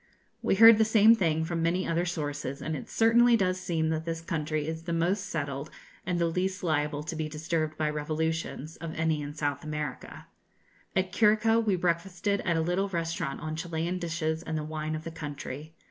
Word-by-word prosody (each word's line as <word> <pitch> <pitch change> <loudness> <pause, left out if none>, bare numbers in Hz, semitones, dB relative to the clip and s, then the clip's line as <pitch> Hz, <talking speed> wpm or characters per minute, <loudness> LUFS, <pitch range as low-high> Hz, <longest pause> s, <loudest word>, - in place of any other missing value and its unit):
We - - +2
heard 225 +1 +9
the - - +6
same 220 0 +6
thing 160 -7 +1
from 165 0 -2
many 175 +3 +1
other 170 +2 0
sources; 145 -4 -3
and 160 +2 -3
it 140 - -7
certainly 230 +1 +5
does 185 -2 0
seem 160 -3 0
that 160 0 -1
this 165 0 -3
country 155 -2 -2
is 160 +1 -4
the 170 0 -4
most 185 +4 0
settled, 140 -3 -3 0.4
and 180 - 0
the 170 - +2
least 185 +3 -1
liable 150 -2 0
to 165 +1 -5
be 155 -1 -3
disturbed 155 0 -2
by 155 - 0
revolutions, 155 0 -3
of 165 -1 -6
any 160 -1 0
in 145 0 -6
South 145 -2 -2
America. 150 -1 -5 0.7
At 185 -1 +1
Curico 225 +2 +4
we 205 -3 +2
breakfasted 180 +3 0
at 170 -2 0
a - - +2
little 180 +4 0
restaurant 165 -5 -3
on 155 0 -4
Chilian 170 +2 -2
dishes 165 -2 -2
and 160 -2 -3
the 155 - -2
wine 155 0 -3
of 155 - -6
the 165 - -6
country. 150 -1 -7
165 Hz, 195 wpm, -29 LUFS, 155-180 Hz, 0.7 s, heard